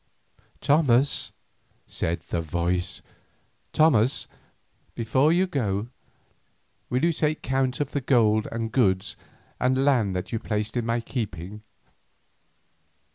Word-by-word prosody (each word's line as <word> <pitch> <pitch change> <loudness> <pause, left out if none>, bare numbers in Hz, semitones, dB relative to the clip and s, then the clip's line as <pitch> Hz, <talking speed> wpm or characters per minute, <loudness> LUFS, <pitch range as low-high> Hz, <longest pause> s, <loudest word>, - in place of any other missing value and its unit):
"Thomas," 140 -2 +3 0.5
said 85 0 -2
the 85 - -1
voice, 85 +2 -1 0.7
"Thomas, 135 -6 +3 0.7
before 130 +6 +2
you 180 +3 +3
go, 115 - -2 1.0
will 125 +3 0
you 170 - +5
not 165 - -2
take 155 0 0
count 130 -1 0
of 145 -1 -2
the 145 - -1
gold 110 -5 +3
and 115 0 -3
goods 95 -6 +1 0.4
and 130 +2 +2
land 115 -9 +2
that 90 0 -4
you 115 - -1
placed 105 0 -2
in 120 -1 -1
my 115 +1 0
keeping?" 105 -4 -5
115 Hz, 120 wpm, -25 LUFS, 100-135 Hz, 1.0 s, you